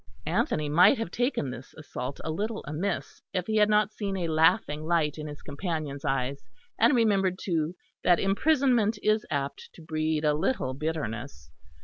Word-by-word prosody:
Anthony 155 - 0
might 180 - +6
have 225 -6 -4
taken 245 - -1
this 125 +2 -10
assault 140 -3 -6
a 160 - -2
little 215 +6 -3
amiss, 170 +6 -3
if 180 -2 0
he 220 +1 0
had 210 0 +5
not 210 0 +3
seen 200 -2 -3
a 170 -3 -2
laughing 155 -1 +3
light 160 -2 +1
in 150 - -5
his 150 0 -9
companion's 145 -2 -4
eyes; 135 0 -1 0.4
and 235 +5 +5
remembered, 195 -5 +2
too, 165 -2 -1 0.3
that 175 -2 +4
imprisonment 240 +1 +2
is 215 0 +2
apt 140 -1 -3
to - - -14
breed 155 -1 -1
a 150 - +4
little 155 - 0
bitterness. 140 - -4
160 Hz, 165 wpm, -28 LUFS, 150-210 Hz, 0.4 s, might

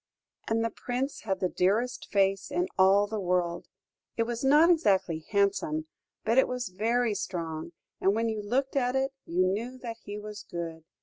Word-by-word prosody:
"And 225 0 +1
the 230 - -1
Prince 255 +3 -3
had 190 -3 -1
the 185 - +3
dearest 210 +8 0
face 195 -1 +2
in 180 +1 0
all 195 +2 +5
the 215 +1 -4
world. 175 -2 0 0.5
It 230 - +3
was 235 +1 -4
not 300 +6 +6
exactly 190 - +2
handsome, 195 -7 +1 0.4
but 230 +4 +4
it - - +4
was 250 -4 -3
very 225 +4 +1
strong, 170 -4 -4 0.3
and 195 +2 +3
when 230 +1 +1
you 220 -1 -2
looked 260 +7 -1
at 250 -1 +1
it, 265 0 0
you 180 +2 +2
knew 225 +7 -2
that 235 -3 -6
he 205 0 -5
was 210 0 -7
good. 165 -3 -5
205 Hz, 180 wpm, -29 LUFS, 185-240 Hz, 0.5 s, not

